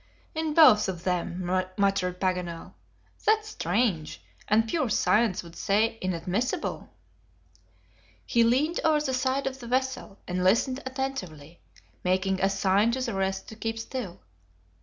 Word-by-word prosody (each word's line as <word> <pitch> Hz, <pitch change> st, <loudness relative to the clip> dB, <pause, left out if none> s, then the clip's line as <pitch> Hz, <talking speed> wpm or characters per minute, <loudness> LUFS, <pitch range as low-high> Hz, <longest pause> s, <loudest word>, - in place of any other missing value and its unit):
"In 315 Hz, -1 st, -2 dB
both 250 Hz, -12 st, +7 dB
of 175 Hz, -2 st, -5 dB
them!" 180 Hz, 0 st, -2 dB, 0.3 s
muttered 195 Hz, -3 st, +1 dB
Paganel; 180 Hz, -3 st, -2 dB, 0.5 s
"that's 430 Hz, 0 st, +2 dB
strange, 195 Hz, -, -1 dB, 0.3 s
and 220 Hz, +2 st, +3 dB
pure 285 Hz, -1 st, 0 dB
science 210 Hz, -2 st, +2 dB
would 170 Hz, 0 st, -13 dB
say 220 Hz, +3 st, +1 dB
inadmissible." 185 Hz, +6 st, -2 dB, 1.4 s
He 235 Hz, -2 st, +3 dB
leaned 275 Hz, +9 st, +2 dB
over 310 Hz, -2 st, +3 dB
the 265 Hz, -, -1 dB
side 260 Hz, +1 st, 0 dB
of 265 Hz, 0 st, -3 dB
the 240 Hz, -, -9 dB
vessel, 260 Hz, -5 st, -2 dB
and 180 Hz, 0 st, -1 dB
listened 235 Hz, +7 st, +2 dB
attentively, 185 Hz, -, -5 dB, 0.4 s
making 185 Hz, +1 st, +1 dB
a 195 Hz, -, +3 dB
sign 195 Hz, +2 st, +2 dB
to 260 Hz, -, -2 dB
the 240 Hz, -3 st, -2 dB
rest 190 Hz, 0 st, -2 dB
to 220 Hz, -, -9 dB
keep 225 Hz, +1 st, -3 dB
still. 225 Hz, -5 st, -6 dB
215 Hz, 140 wpm, -27 LUFS, 185-260 Hz, 1.4 s, both